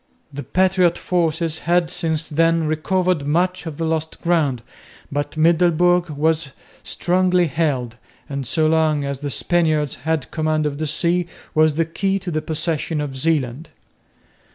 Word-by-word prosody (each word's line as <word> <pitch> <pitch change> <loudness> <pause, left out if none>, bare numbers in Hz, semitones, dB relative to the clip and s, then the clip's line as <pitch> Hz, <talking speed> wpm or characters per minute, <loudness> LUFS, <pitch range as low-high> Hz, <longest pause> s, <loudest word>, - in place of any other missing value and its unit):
The 145 - -5
patriot 180 +4 +2
forces 165 -2 0
had 175 -1 +2
since 160 -1 0
then 165 +1 +2
recovered 160 0 0
much 180 +3 0
of 150 -3 -6
the 165 - -2
lost 160 0 -2
ground, 150 -9 +1 0.5
but 145 +2 -3
Middelburg 175 +2 +3
was 155 -1 0 0.3
strongly 180 0 +1
held, 135 -6 -1 0.3
and 140 -3 -4
so 155 -1 +1
long 155 -2 +2
as 140 -1 -3
the 145 0 -4
Spaniards 155 -1 +1
had 160 -4 -1
command 155 -1 0
of 145 -1 -3
the 155 - -2
sea, 170 +3 0 0.3
was 155 -1 +3
the 165 +1 +1
key 195 +4 -1
to 180 -2 -5
the 155 -1 -1
possession 155 0 -2
of 145 -2 -4
Zeeland. 140 0 -1
160 Hz, 150 wpm, -21 LUFS, 150-175 Hz, 0.5 s, Middelburg